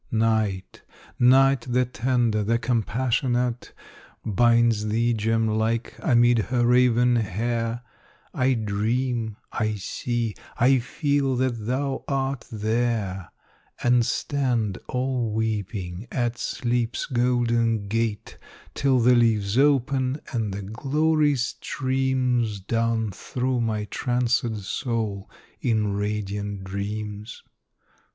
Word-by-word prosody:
Night 110 -4 0 0.4
Night 135 +1 +5
the 125 +1 +2
tender, 120 -1 0
the 115 +3 +1
compassionate, 120 +1 0 0.5
Binds 115 0 +3
thee, 115 +3 +1
gem 115 +1 +1
like, 110 +2 -1
amid 120 -1 +4
her 120 +2 0
raven 125 0 +4
hair; 115 +3 -2 0.5
I 130 0 +2
dream 110 +1 -1
I 110 -1 -1
see 115 +3 -3 0.2
I 130 +2 +4
feel 140 +1 0
that 120 -4 -1
thou 135 +2 -1
art 135 -2 -2
there 110 -4 -1 0.5
And 120 0 +4
stand 120 -7 -1
all 125 -3 -1
weeping 105 -3 -3
at 120 -2 -1
Sleep's 120 -1 -1
golden 120 -4 +1
gate, 110 0 -2 0.3
Till 135 -2 +2
the 125 +2 +5
leaves 110 -4 +2
open, 135 0 +2
and 110 -4 -1
the 100 +1 -5
glory 150 +7 +1
streams 130 -3 -1
Down 115 +2 0
through 125 +5 -2
my 110 -2 -1
trancèd 120 -1 0
soul 110 -2 -3 0.3
in 110 -4 +1
radiant 105 -1 -3
dreams. 105 +2 -5
115 Hz, 100 wpm, -24 LUFS, 110-125 Hz, 0.5 s, Night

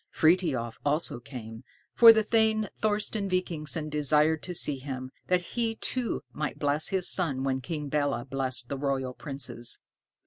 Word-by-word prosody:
Frithiof 155 -9 +2
also 145 -3 0
came, 120 -2 -9 0.3
for 230 -1 +10
the 220 -1 +3
thane 220 -1 +2
Thorsten 210 -1 -1
Vikingsson 165 -4 -1
desired 150 +1 +2
to 180 - -6
see 145 -4 0
him, 130 -1 -6 0.2
that 180 -1 +2
he 230 -2 0
too 250 +1 -3
might 150 0 -3
bless 145 +1 0
his 190 -2 0
son 140 -8 +2
when 130 -1 0
King 150 -1 -4
Belé 140 -4 -1
blessed 130 -2 -3
the 140 +1 -4
royal 135 -2 -1
princes. 125 -4 -2
150 Hz, 150 wpm, -28 LUFS, 130-185 Hz, 0.3 s, for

